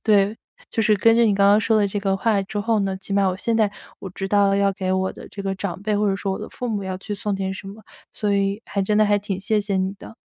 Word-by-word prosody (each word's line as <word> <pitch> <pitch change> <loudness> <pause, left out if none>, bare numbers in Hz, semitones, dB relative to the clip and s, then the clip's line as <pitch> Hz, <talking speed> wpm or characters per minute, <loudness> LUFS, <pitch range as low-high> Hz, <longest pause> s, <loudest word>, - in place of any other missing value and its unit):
对， 205 -1 +3 0.4
就 225 - 0
是 215 -1 +4
根 225 +3 +4
据 235 0 +4
你 205 - +3
刚 200 0 +4
刚 205 +1 +5
说 220 +1 +2
的 210 -1 +3
这 200 +1 -3
个 195 -1 0
话 205 0 +1
之 205 +2 -5
后 220 +1 +1
呢， 195 -1 -1
起 195 +1 -8
码 200 -1 +3
我 185 - -2
现 230 +4 -1
在 215 -2 +3 0.3
我 190 - -7
知 195 +1 -4
道 200 0 +3
了 195 - +2
要 200 0 +2
给 185 -1 -3
我 190 0 0
的 - - -11
这 200 - -8
个 195 0 -2
长 190 -1 -5
辈 210 0 0
或 210 0 +2
者 195 - 0
说 195 -1 -2
我 - - -4
的 - - -7
父 250 - -5
母 210 -4 -2
要 190 -1 -4
去 205 +2 -5
送 205 0 -2
点 190 0 -2
什 195 0 -8
么， 215 +2 -11 0.3
所 205 -1 -1
以 200 +2 0
还 200 - -2
真 210 +2 +1
的 215 - +5
还 205 0 +3
挺 200 -2 -4
谢 215 +2 +1
谢 200 -1 -1
你 190 0 0
的。 225 - -12
200 Hz, 330 characters per minute, -22 LUFS, 195-210 Hz, 0.4 s, 刚